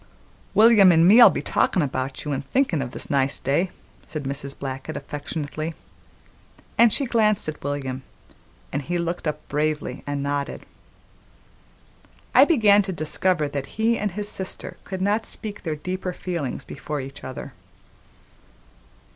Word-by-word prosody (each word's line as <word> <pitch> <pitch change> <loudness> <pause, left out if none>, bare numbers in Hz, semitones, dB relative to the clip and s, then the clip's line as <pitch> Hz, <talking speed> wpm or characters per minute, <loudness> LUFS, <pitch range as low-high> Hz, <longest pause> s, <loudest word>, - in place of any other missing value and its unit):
"William 215 -4 +7
an' 165 0 +5
me'll 225 +6 +9
be - - -3
talkin' 180 - +2
about 130 0 -3
you 150 - -1
an' 135 - -2
thinkin' 165 - 0
o' 135 - -2
this 125 - -6
nice 140 -1 +2
day," 145 +8 +1 0.3
said 155 -2 -6
Mrs. 140 0 -4
Blackett 135 +3 -5
affectionately, 155 +2 -5 1.0
and 235 -1 +6
she 280 - +1
glanced 215 -6 +2
at 155 - -5
William, 135 -2 -3 0.7
and 145 - -1
he 175 +5 -2
looked 170 0 -2
up 150 0 -4
bravely 150 -3 -2
and 145 -1 -2
nodded. 140 0 -3 1.7
I - - +8
began 215 - +5
to 195 -1 -4
discover 155 0 0
that 140 -1 -4
he 225 +1 +3
and 210 -4 -2
his 205 +1 -1
sister 190 -2 -5
could 190 -1 -4
not 210 +3 +1
speak 210 -2 -5
their 160 -3 -3
deeper 180 +4 -4
feelings 170 -8 -4
before 150 -1 -5
each 135 +1 -8
other. 130 0 -7
155 Hz, 145 wpm, -24 LUFS, 140-195 Hz, 1.7 s, me'll